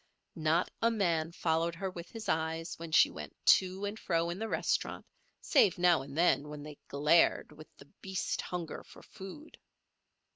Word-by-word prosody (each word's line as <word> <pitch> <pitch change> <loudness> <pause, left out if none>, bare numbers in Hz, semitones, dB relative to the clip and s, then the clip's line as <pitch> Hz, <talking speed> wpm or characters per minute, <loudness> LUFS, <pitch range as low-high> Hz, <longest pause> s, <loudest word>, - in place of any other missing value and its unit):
Not 160 +2 +1
a 230 - +4
man 170 -7 0
followed 165 0 0
her 190 +2 -4
with 170 -1 -9
his 225 -1 -8
eyes 160 +1 -1
when 165 -1 -7
she - - +5
went - - -9 0.2
to 190 +1 -6
and 205 +2 -5
fro 170 -1 0
in 175 - -6
the 225 0 -3
restaurant - - -1 0.4
save 185 -3 +4
now 175 -4 +4
and 140 +2 -9
then 160 -4 +3
when 150 -1 -8
they 150 -1 -10
glared 150 +4 +3
with 155 - -13
the - - -14 0.2
beast 190 -1 -2
hunger 175 -3 -5
for - - -16
food. 195 +12 -11
170 Hz, 175 wpm, -32 LUFS, 160-190 Hz, 0.4 s, she